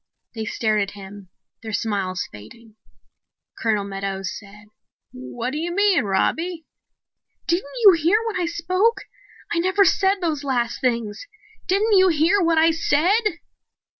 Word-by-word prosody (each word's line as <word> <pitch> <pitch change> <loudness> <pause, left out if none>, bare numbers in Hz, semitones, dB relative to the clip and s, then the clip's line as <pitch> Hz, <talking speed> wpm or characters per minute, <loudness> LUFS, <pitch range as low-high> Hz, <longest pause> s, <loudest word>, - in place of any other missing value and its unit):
They 220 -1 -5
stared 215 -1 0
at 195 - -3
him, 195 -1 -11 0.3
their 220 -1 -7
smiles 200 -4 -2
fading. 215 - -14 0.9
Colonel 215 -3 0
Meadows 195 -1 -4
said, 210 0 -13 0.4
"What 125 - -6
do 300 - -4
you 340 +2 -3
mean, 395 - +3
Robbie?" 320 - -1 0.8
"Didn't 340 -4 -1 0.2
you 400 - +11
hear 335 +4 +2
when 420 -5 -2
I 345 - 0
spoke? 370 +7 0 0.5
I 340 - +1
never 375 +3 +3
said 390 +1 +2
those 315 -5 -2
last 245 -4 -1
things. 235 - -2 0.4
Didn't 410 +3 +2
you 375 0 +6
hear 340 +4 +2
what 335 -2 +2
I 325 +1 +5
said?" 350 +5 +1
300 Hz, 140 wpm, -22 LUFS, -, 0.9 s, you